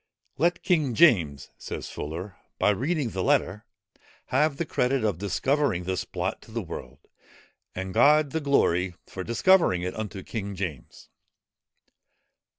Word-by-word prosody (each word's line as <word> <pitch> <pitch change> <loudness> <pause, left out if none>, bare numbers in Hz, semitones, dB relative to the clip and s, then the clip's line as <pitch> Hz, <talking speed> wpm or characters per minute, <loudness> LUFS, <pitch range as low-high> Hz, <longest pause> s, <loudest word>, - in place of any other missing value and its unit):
"Let 170 +3 +1
King 150 -9 +1
James," 85 - +3
says - - -6
Fuller, 85 +7 -6 0.2
"by - - +3
reading 135 - -1
the 95 - -3
letter, 105 +3 +1 0.6
have 150 -2 +2
the 170 - -1
credit 130 -4 0
of 105 -6 0
discovering 105 +2 0
this 95 0 -2
plot - - -3
to - - -16
the - - -3
world, - - -8 0.8
and 95 0 -4
God 145 +4 +5
the 160 - -2
glory, 90 -11 +2
for 95 - -7
discovering 115 - +3
it 90 - -3
unto 105 -3 -5
King 100 -3 -5
James." 90 -9 -6
110 Hz, 140 wpm, -26 LUFS, 90-145 Hz, 0.8 s, God